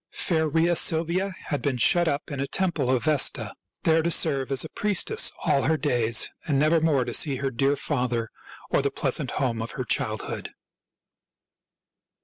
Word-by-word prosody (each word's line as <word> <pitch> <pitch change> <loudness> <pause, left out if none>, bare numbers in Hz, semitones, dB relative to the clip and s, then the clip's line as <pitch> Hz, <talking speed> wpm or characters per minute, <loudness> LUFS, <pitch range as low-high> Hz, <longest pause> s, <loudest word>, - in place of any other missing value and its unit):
Fair 160 -3 0
Rhea 165 +3 +2
Silvia 170 +4 +1 0.2
had 145 -4 -2
been 140 -3 -1
shut 175 +8 +3
up 145 +1 -3
in 140 - -5
a 140 - -2
temple 170 -9 -1
of 130 -2 +1
Vesta, 155 -3 +1 0.3
there 160 0 +3
to 170 - -1
.serve 135 -5 +2
as 135 - +3
a - - -8
priestess 210 - +1
all 140 - +2
her 160 0 +2
days, 120 -7 +1 0.2
and 145 -4 +1
nevermore 155 -3 +2
to - - -5
see 145 -4 +2
her 135 +1 -3
dear 135 +4 +1
father 125 -5 -2 0.4
or - - +2
the - - 0
pleasant - - -2
home 115 -4 -1
of 115 - -5
her - - -2
childhood. - - -3
145 Hz, 170 wpm, -25 LUFS, 130-165 Hz, 0.4 s, shut